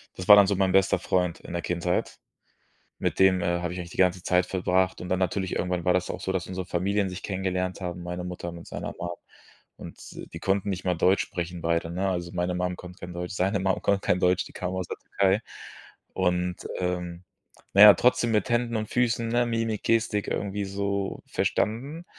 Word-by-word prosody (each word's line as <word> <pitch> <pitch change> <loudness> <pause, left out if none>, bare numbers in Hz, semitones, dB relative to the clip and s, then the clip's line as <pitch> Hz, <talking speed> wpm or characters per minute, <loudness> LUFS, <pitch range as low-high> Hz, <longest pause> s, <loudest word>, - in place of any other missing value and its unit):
das 95 - -7
war 105 - +11
dann 100 -1 +7
so 100 - +1
mein 95 -1 +2
bester 95 0 +3
Freund 90 -2 0
in - - -9
der 85 - -2
Kindheit. 90 +1 -1 0.8
Mit - - -2
dem, 95 -1 +5
äh, 85 0 0
habe 85 0 -3
ich 90 - -5
eigentlich 85 0 -7
die - - -11
ganze 90 -1 +2
Zeit 90 -1 +2
verbracht 95 0 0
und 90 - -6
dann 95 - +1
natürlich, 95 +1 -1
irgendwann 90 -2 -1
war 90 - +4
das 90 0 0
auch - - -4
so, 95 - -2
dass 95 -2 -2
unsere 95 -1 -4
Familien 95 +2 0
sich 90 +2 -7
kennengelernt 95 -1 -2
haben, 90 -1 -4
meine 90 +1 -5
Mutter 90 -1 -5
mit 85 0 -10
seiner - - -5
Mom. 85 0 -4 0.7
Und - - -10 0.4
die 85 - -6
konnten 100 +2 0
nicht 95 -1 -4
mal 90 -1 +1
Deutsch 95 +4 +3
sprechen, 85 -1 -5
beide, 85 0 0
ne? 95 +3 -1
Also, 85 -2 -3
meine 90 0 -1
Mum 90 0 -1
konnte 90 0 -11
kein 90 0 -8
Deutsch, 90 +1 -5
seine 95 +1 0
Mum 95 0 0
konnte 100 -1 +2
kein 90 - +1
Deutsch, 90 +1 +3
die - - -15
kamen 90 0 -4
aus 95 -2 -3
der - - -5
Türkei. 100 +2 +1 0.7
Und, 90 -1 0 0.2
ähm, 90 -1 -3 0.5
na 100 - +6
ja, 105 -1 +12
trotzdem 125 -2 +2
mit 110 +4 +1
Händen 120 0 +1
und 110 -1 -4
Füßen, 120 -1 +1
ne, 120 +1 +2
Mimik, 115 -2 -2
Gestik 115 -2 +1
irgendwie 100 0 -2
so 100 0 -2
verstanden. 140 +10 -1
95 Hz, 215 wpm, -26 LUFS, 90-100 Hz, 0.8 s, ja